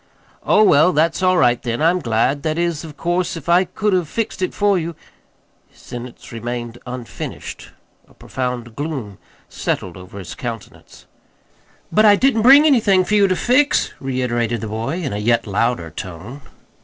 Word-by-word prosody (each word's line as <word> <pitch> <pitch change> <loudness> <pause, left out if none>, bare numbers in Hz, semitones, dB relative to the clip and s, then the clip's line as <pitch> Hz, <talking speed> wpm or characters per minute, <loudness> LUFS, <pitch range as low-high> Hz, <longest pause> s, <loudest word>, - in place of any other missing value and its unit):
"Oh, 215 - +4
well, 160 -2 +5
that's 160 +4 +1
all 185 -1 +3
right, 120 -6 +3
then. 120 -2 -3
I'm 170 +3 +3
glad. 125 +1 0
That 155 +1 -2
is, 170 -2 -1
of 155 -2 -10
course, 175 0 -1
if 160 - -10
I 175 +2 +4
could 205 +3 -1
have 180 -5 0
fixed 225 -4 -3
it 185 - 0
for 205 -1 +2
you 170 0 -5 0.7
His - - -25
sentence 120 0 -9
remained 120 0 -5
unfinished. 125 -1 -7 0.4
A - - -22
profound 125 -3 -5
gloom 135 - -5 0.3
settled 90 -2 -3
over 90 +2 -11
his 95 -3 -7
countenance. 115 -5 -9 0.9
"But 215 +1 +4
I 205 -1 +7
didn't 250 0 +2
bring 275 +6 +7
anything 210 -10 +4
for 210 - -2
you 205 -1 +5
to 185 - +1
fix," 260 +8 +2
reiterated 120 -3 -2
the 110 - -4
boy, 115 +12 -3
in 135 - -3
a 105 - -3
yet 115 +2 +1
louder 105 -4 -1
tone. 95 - -8
145 Hz, 170 wpm, -19 LUFS, 120-185 Hz, 0.9 s, I